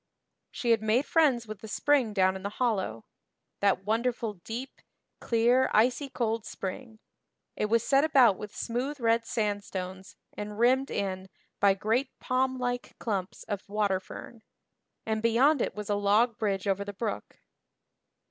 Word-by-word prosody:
She 240 Hz, -, -1 dB
had 225 Hz, -1 st, +4 dB
made 220 Hz, +6 st, +2 dB
friends 275 Hz, -8 st, +3 dB
with 215 Hz, -2 st, -8 dB
the 220 Hz, -, -8 dB
spring 270 Hz, 0 st, +2 dB
down 190 Hz, -2 st, +2 dB
in 190 Hz, -, -6 dB
the 200 Hz, -, -3 dB
hollow 190 Hz, -, -1 dB, 0.5 s
that 200 Hz, -2 st, +2 dB
wonderful 230 Hz, 0 st, 0 dB
deep, 225 Hz, +8 st, -7 dB, 0.4 s
clear 245 Hz, +3 st, +3 dB
icy 250 Hz, +6 st, +3 dB
cold 230 Hz, -3 st, -1 dB
spring; 220 Hz, +5 st, -6 dB, 0.6 s
it -, -, 0 dB
was 230 Hz, +1 st, +2 dB
set 275 Hz, 0 st, +3 dB
about 265 Hz, -9 st, +5 dB
with 210 Hz, +1 st, -9 dB
smooth 260 Hz, +5 st, -3 dB
red 230 Hz, -1 st, +2 dB
sandstones 195 Hz, -3 st, -3 dB, 0.2 s
and 210 Hz, 0 st, -6 dB
rimmed 260 Hz, +4 st, +3 dB
in 190 Hz, -1 st, -3 dB, 0.3 s
by 200 Hz, -1 st, +5 dB
great 225 Hz, +7 st, -1 dB
palm 260 Hz, 0 st, 0 dB
like 245 Hz, -1 st, -3 dB
clumps 195 Hz, -5 st, -3 dB
of 200 Hz, -1 st, -5 dB
water 205 Hz, -2 st, +1 dB
fern; 220 Hz, +4 st, -11 dB, 0.6 s
and 220 Hz, 0 st, -1 dB
beyond 245 Hz, +5 st, +4 dB
it -, -, -2 dB
was 210 Hz, -1 st, -6 dB
a 205 Hz, -, +1 dB
log 205 Hz, +4 st, +3 dB
bridge 200 Hz, -3 st, -1 dB
over 200 Hz, 0 st, +1 dB
the 205 Hz, 0 st, -7 dB
brook. 210 Hz, +1 st, -5 dB
220 Hz, 155 wpm, -29 LUFS, 200-245 Hz, 0.6 s, about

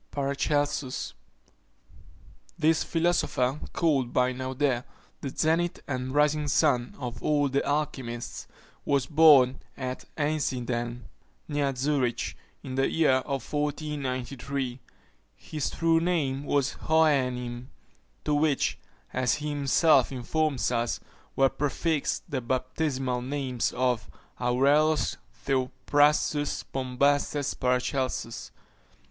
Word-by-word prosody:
PARACELSUS. 140 Hz, -1 st, -1 dB, 1.4 s
This 160 Hz, -1 st, +3 dB
philosopher, 160 Hz, -5 st, +1 dB
called 140 Hz, -7 st, +1 dB
by 125 Hz, 0 st, +2 dB
Naudé 130 Hz, 0 st, -1 dB, 0.4 s
"the 140 Hz, -, -3 dB
zenith 165 Hz, +5 st, +1 dB
and 130 Hz, 0 st, -3 dB
rising 150 Hz, 0 st, +3 dB
sun 130 Hz, -5 st, +2 dB
of 125 Hz, -3 st, -6 dB
all 145 Hz, -2 st, +2 dB
the 140 Hz, +1 st, +1 dB
alchymists," 130 Hz, -5 st, -3 dB, 0.4 s
was 140 Hz, -2 st, +1 dB
born 145 Hz, -4 st, +6 dB, 0.2 s
at 130 Hz, -1 st, -5 dB
Einsiedeln, 125 Hz, -5 st, -1 dB, 0.5 s
near 145 Hz, -3 st, 0 dB
Zurich, 130 Hz, -2 st, 0 dB, 0.3 s
in 130 Hz, -, -6 dB
the 135 Hz, +1 st, +1 dB
year 140 Hz, -5 st, +3 dB
1493. 140 Hz, -2 st, -3 dB, 0.6 s
His 150 Hz, -3 st, -4 dB
true 165 Hz, 0 st, +2 dB
name 150 Hz, -6 st, 0 dB
was 140 Hz, -1 st, +1 dB, 0.2 s
Hohenheim; 125 Hz, -6 st, +1 dB, 0.6 s
to 150 Hz, -, +1 dB
which, 145 Hz, -1 st, +1 dB, 0.3 s
as 125 Hz, -1 st, +2 dB
he 150 Hz, 0 st, -4 dB
himself 145 Hz, -1 st, +3 dB
informs 135 Hz, +1 st, 0 dB
us, 120 Hz, -1 st, 0 dB, 0.4 s
were 135 Hz, -, +5 dB
prefixed 145 Hz, +2 st, -1 dB
the 140 Hz, -6 st, -2 dB
baptismal 130 Hz, +1 st, -1 dB
names 130 Hz, -2 st, -2 dB
of 125 Hz, -3 st, 0 dB, 0.3 s
Aureolus 140 Hz, +5 st, +2 dB, 0.3 s
Theophrastus 145 Hz, +3 st, +1 dB
Bombastes 140 Hz, +2 st, 0 dB
Paracelsus. 125 Hz, -1 st, -1 dB
140 Hz, 95 wpm, -27 LUFS, 125-150 Hz, 1.4 s, born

